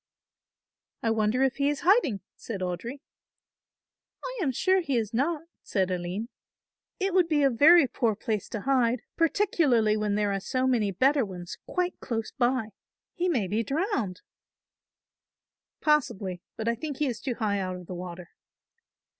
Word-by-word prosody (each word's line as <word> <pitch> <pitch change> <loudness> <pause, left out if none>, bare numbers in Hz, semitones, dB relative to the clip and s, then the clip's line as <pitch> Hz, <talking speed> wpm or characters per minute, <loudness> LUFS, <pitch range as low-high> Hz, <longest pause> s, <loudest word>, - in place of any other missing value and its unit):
"I 225 - +2
wonder 225 +3 +2
if 265 -2 +1
he 280 0 +2
is 295 - -2
hiding," 345 - +3
said 205 -5 -6
Audry. 185 - -4 1.2
"I - - -5
am 285 -7 +1
sure 375 +9 +2
he 280 -7 0
is 225 -1 -2
not," 295 +6 0 0.2
said 190 -3 0
Aline. 180 +6 -3 0.7
"It 385 -1 0
would 365 -2 +4
be 300 -3 +2
a 275 - +4
very 310 +6 +7
poor 230 -3 0
place 215 -1 -3
to 215 - -4
hide, 250 -2 +2
particularly 310 - +3
when 210 -1 0
there 205 -1 +1
are 195 - -1
so 255 +6 -1
many 235 -6 +2
better 265 +8 +3
ones 180 -4 -7
quite 360 0 -1
close 225 -3 -3
by. 245 -4 0 0.4
He 360 0 0
may 240 - +1
be 215 +4 0
drowned." 275 - -1 1.6
"Possibly, 200 - +1 0.2
but 220 - -3
I 235 - +3
think 285 +3 -5
he 300 - +1
is 245 -5 -3
too 255 -3 -2
high 205 -3 0
out 185 -1 -3
of 180 -1 -9
the 180 - -7
water." 175 -1 -7
235 Hz, 165 wpm, -27 LUFS, 205-295 Hz, 1.6 s, very